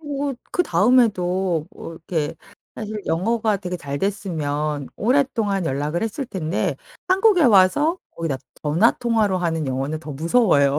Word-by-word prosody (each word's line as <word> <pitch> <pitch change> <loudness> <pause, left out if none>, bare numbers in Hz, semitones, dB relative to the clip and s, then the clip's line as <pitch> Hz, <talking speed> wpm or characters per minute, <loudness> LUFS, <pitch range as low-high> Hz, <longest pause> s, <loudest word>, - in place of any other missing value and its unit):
어 285 -2 -3 0.2
그 355 - +2
다음에도 190 - +2
어 - - -8
이렇게 160 -2 -3 0.4
사실 215 -1 -5
영어가 215 +5 +1
되게 180 -2 -5
잘 140 -4 -5
됐으면 150 -7 -2
오랫동안 225 -6 +1
연락을 150 +4 -1
했을 225 +5 -3
텐데 180 -7 -2 0.3
한국에 380 -1 +4
와서 245 - +4 0.2
거기다 165 -5 -2 0.3
전화 160 +10 +4
통화로 220 -5 +1
하는 165 -3 -1
영어는 135 +4 -2
더 155 -2 -7
무서워요. 150 - +3
185 Hz, 305 characters per minute, -22 LUFS, 155-230 Hz, 0.4 s, 한국에